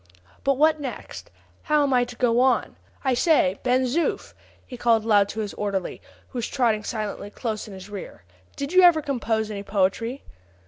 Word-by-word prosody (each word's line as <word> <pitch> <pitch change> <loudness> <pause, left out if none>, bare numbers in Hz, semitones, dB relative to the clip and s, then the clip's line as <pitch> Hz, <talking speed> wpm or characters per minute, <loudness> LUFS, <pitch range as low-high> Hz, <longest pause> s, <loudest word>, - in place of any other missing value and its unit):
But 275 -1 +2
what 310 +2 +4
next? 270 -4 -7 0.3
how 300 -2 +2
am 275 -2 +1
I 245 -1 +3
to 245 - -10
go 240 -1 +2
on? 255 -1 +2 0.3
I 265 -2 +2
say, 245 - +3
Ben 255 +1 +2
Zoof," 285 +7 -1 0.3
he 255 - -9
called 230 -2 +2
aloud 205 -3 +4
to 220 - -4
his 205 -2 -4
orderly, 200 -3 -3 0.3
who 250 - -5
was 235 - -2
trotting 230 -5 +1
silently 210 -2 -4
close 220 0 -4
in 200 - -9
his 190 0 -10
rear, 200 - -9 0.3
"did 280 +4 -4
you 370 - +7
ever 345 -4 +6
compose 225 -6 -1
any 200 -1 -5
poetry?" 205 +6 -1
240 Hz, 185 wpm, -24 LUFS, 210-275 Hz, 0.3 s, you